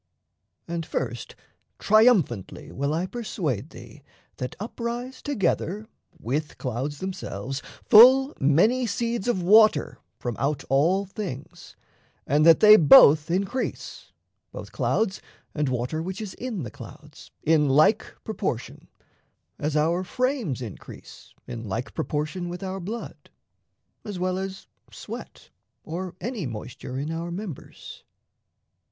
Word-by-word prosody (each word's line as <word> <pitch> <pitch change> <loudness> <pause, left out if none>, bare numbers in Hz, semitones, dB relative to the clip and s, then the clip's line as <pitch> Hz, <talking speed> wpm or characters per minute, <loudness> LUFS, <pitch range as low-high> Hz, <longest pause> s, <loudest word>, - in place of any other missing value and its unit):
And 170 0 -3
first - - -4 0.4
triumphantly 205 - +2
Will 140 +2 -2
I 165 +4 -1
persuade 185 - -4
thee - - -13 0.4
that 125 - -5
up 215 +5 -8
rise 240 +2 -4
together, 210 - -1 0.3
With 150 +4 -3
clouds 130 +3 -4
themselves, 135 - -5 0.2
full 260 +5 +7
many 210 - +3
seeds 230 +1 -2
of 190 -7 0
water 215 +4 +4 0.2
From 120 -2 -4
out 140 +1 -1
all 170 +9 +2
things, 185 -8 -8 0.5
and 150 +3 +3
that 165 - +7
they 215 0 +9
both 150 -1 +7
increase 195 +8 -3 0.4
Both - - -9
clouds 200 -4 -1 0.3
and 150 -3 -1
water 125 +5 -2
which 185 +4 -5
is 210 -3 -6
in 235 - -5
the 120 - -7
clouds - - -13
In 150 -2 +3
like 155 +11 +3
proportion, 195 - -4 0.7
as 150 +1 -1
our 165 +4 +1
frames 240 - -2
increase 110 -5 -11
In 115 -3 -7
like 115 +7 -4
proportion 155 +3 -3
with 180 +2 -7
our 190 0 -4
blood, 215 +6 -7 0.7
as 205 -3 -6
well 185 +1 -1
As 190 0 -6 0.3
sweat - - -10 0.3
or 175 +2 -6
any 215 - -4
moisture 120 +3 -7
in 145 +4 -3
our 165 +1 -4
members. 175 -3 -8
175 Hz, 125 wpm, -25 LUFS, 145-210 Hz, 0.7 s, they